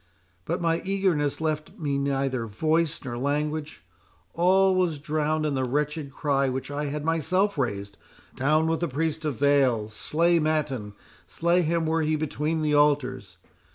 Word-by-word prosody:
—But 175 +3 -2
my 165 0 +1
eagerness 185 -7 0
left 155 -1 -3
me 140 -3 -1
neither 135 -3 -1
voice 155 +8 0
nor 120 -2 -4
language—all 150 - -1
was 180 -4 +1
drowned 155 +1 -1
in 150 - 0
the 130 -1 0
wretched 145 +2 -2
cry 140 -1 0
which 130 +2 -4
I 145 +1 -2
had 145 +1 -4
myself 185 +5 +1
raised—Down 130 +6 -2
with 160 0 0
the 170 - 0
priest 160 +3 -2
of 145 -6 -2
Baal! 135 -6 +3
Slay 170 +9 +1
Mattan— 145 -9 -1 0.3
slay 170 +2 +1
him 165 0 0
were 160 +1 +1
he 155 0 +1
between 155 +1 -2
the 150 -1 +1
altars! 130 -9 +1
150 Hz, 150 wpm, -26 LUFS, 135-160 Hz, 0.3 s, Baal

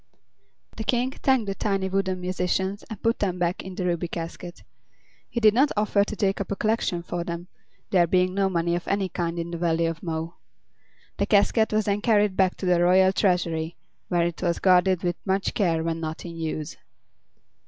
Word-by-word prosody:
The 220 - -3
King 245 +3 +1
thanked 265 -4 +1
the 195 - -2
tiny 195 -1 -1
wooden 190 -1 -1
musicians 185 +2 -1
and 220 - -7
put 230 +1 +1
them 185 -3 -1
back 175 0 -1
in 190 -1 -8
the 180 - -3
Ruby 175 -1 -1
Casket. 170 +1 -7 0.7
He 235 - -2
did 215 -2 +5
not 270 +5 +3
offer 205 -1 +3
to 215 - -5
take 195 -1 0
up 200 - -5
a - - 0
collection 215 -5 0
for 175 0 -3
them, 170 +1 -6 0.4
there 175 -3 +4
being 185 +1 +2
no 195 0 +1
money 170 -1 0
of 175 - -5
any 195 -1 0
kind 170 -1 -3
in 170 0 -4
the 170 - -4
Valley 165 -1 +1
of 165 0 -3
Mo. 165 0 -4 0.8
The - - 0
casket 220 +2 +3
was 215 -1 +1
then 205 0 0
carried 210 -4 +3
back 185 -1 +2
to - - -5
the 180 -1 +3
royal 185 +2 +5
treasury, 170 -4 0 0.3
where 175 -1 +1
it 170 -1 -4
was 170 -2 0
guarded 185 -1 +3
with 175 -1 -1
much 195 0 0
care 165 -5 +1
when 165 0 -2
not 160 +1 -5
in 170 -1 -7
use. 155 -1 -4
185 Hz, 200 wpm, -25 LUFS, 170-200 Hz, 0.8 s, did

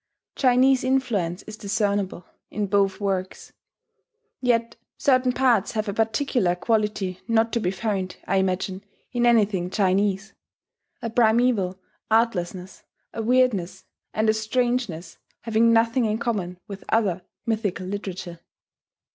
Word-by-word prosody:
Chinese 260 0 +4
influence 235 -10 0
is 215 - -9
discernible 200 -3 -1 0.2
in 210 0 -2
both 195 0 +1
works; 190 -2 -3 0.9
yet 235 -2 +1 0.2
certain 255 -2 +3
parts 245 -5 +2
have 215 -1 -2
a 200 - -2
particular 225 -3 +1
quality 210 -2 -1
not 225 0 +2
to 235 - +2
be 180 - 0
found, 190 -2 -2
I 195 - +1
imagine, 190 0 -1 0.3
in 240 -1 +2
anything 205 -6 +2
Chinese, 195 +1 0 0.7
a 230 - -3
primeval 220 -5 +2 0.3
artlessness, 190 -5 0 0.3
a 225 - -3
weirdness, 235 -6 +1 0.3
and 215 +1 0
a 215 - +5
strangeness 220 -6 -2 0.2
having 230 0 +3
nothing 230 +2 +3
in 215 0 0
common 195 -7 -2
with 200 -1 -8
other 195 -5 +1 0.2
mythical 210 -5 -2
literature. 185 -3 -6
215 Hz, 120 wpm, -24 LUFS, 190-230 Hz, 0.9 s, a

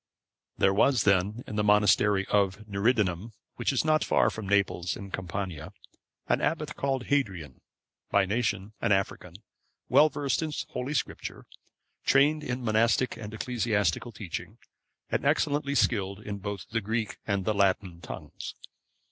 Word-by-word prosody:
There 95 - +4
was 120 +3 +3
then 100 +4 +2
in 105 - -6
the 105 - +2
monastery 105 -1 +4
of 100 +1 +1
Niridanum, 105 -1 0 0.2
which - - +1
is - - 0
not 155 0 +3
far - - +3
from 105 -3 -6
Naples 100 -3 +1
in 100 -1 -9
Campania, 90 -4 -5 0.5
an - - +1
abbot 150 -2 -1
called 135 -2 -1
Hadrian,(522) 95 - -1 0.5
by 100 -1 +3
nation 105 -1 -1
an - - +1
African, 95 -2 -2 0.5
well 155 - +6
versed 140 -2 -1
in 160 -1 -2 0.2
Holy 135 +4 -3
Scripture, - - -4 0.6
trained 150 +3 +4
in 125 -2 -3
monastic 115 +3 +2
and 105 -1 -8
ecclesiastical 110 -3 -1
teaching, 95 -5 -7 0.5
and - - 0
excellently 145 -1 +1
skilled 100 -5 +1 0.2
both 100 -1 -4
in 105 - -15
the 115 - +1
Greek 110 +1 -2
and 100 -3 0
Latin 95 -4 +1
tongues. - - -8
105 Hz, 140 wpm, -28 LUFS, 95-125 Hz, 0.6 s, well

